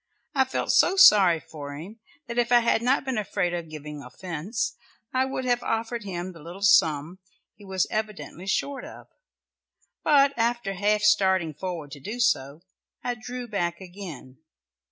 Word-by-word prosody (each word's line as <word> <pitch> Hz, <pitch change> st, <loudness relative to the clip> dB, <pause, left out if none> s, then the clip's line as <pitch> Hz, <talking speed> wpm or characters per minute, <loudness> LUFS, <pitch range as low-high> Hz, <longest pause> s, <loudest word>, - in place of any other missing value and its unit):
I 265 Hz, -1 st, +3 dB
felt 260 Hz, -, -1 dB
so 370 Hz, -, +4 dB
sorry 195 Hz, -, +7 dB
for 145 Hz, -3 st, -9 dB
him 190 Hz, +10 st, -10 dB, 0.3 s
that 235 Hz, +1 st, -3 dB
if 240 Hz, 0 st, +1 dB
I 240 Hz, -1 st, +7 dB
had 230 Hz, -1 st, +2 dB
not 260 Hz, +3 st, +2 dB
been 260 Hz, -4 st, -1 dB
afraid 180 Hz, -4 st, -1 dB
of 170 Hz, -2 st, -4 dB
giving 150 Hz, -1 st, -8 dB
offence, 175 Hz, -, -4 dB, 0.4 s
I 260 Hz, 0 st, +2 dB
would 265 Hz, -1 st, -4 dB
have 245 Hz, -1 st, +1 dB
offered 225 Hz, 0 st, -2 dB
him 180 Hz, -1 st, -4 dB
the 165 Hz, -3 st, -14 dB
little 175 Hz, +5 st, -9 dB
sum 160 Hz, -2 st, +3 dB, 0.3 s
he 205 Hz, -, -18 dB
was 190 Hz, -1 st, 0 dB
evidently 215 Hz, -4 st, -4 dB
short 275 Hz, +6 st, -1 dB
of, -, -, -11 dB, 0.9 s
but 280 Hz, -2 st, +5 dB
after 235 Hz, -3 st, 0 dB
half 210 Hz, +2 st, +1 dB
starting 190 Hz, -6 st, +3 dB
forward 165 Hz, -3 st, -6 dB
to 145 Hz, -, -8 dB
do 215 Hz, -, -6 dB
so, 145 Hz, -, +1 dB, 0.4 s
I 245 Hz, -, -1 dB
drew 245 Hz, +2 st, -7 dB
back 175 Hz, -5 st, -2 dB
again. 175 Hz, -9 st, -10 dB
195 Hz, 165 wpm, -26 LUFS, 170-235 Hz, 0.9 s, sorry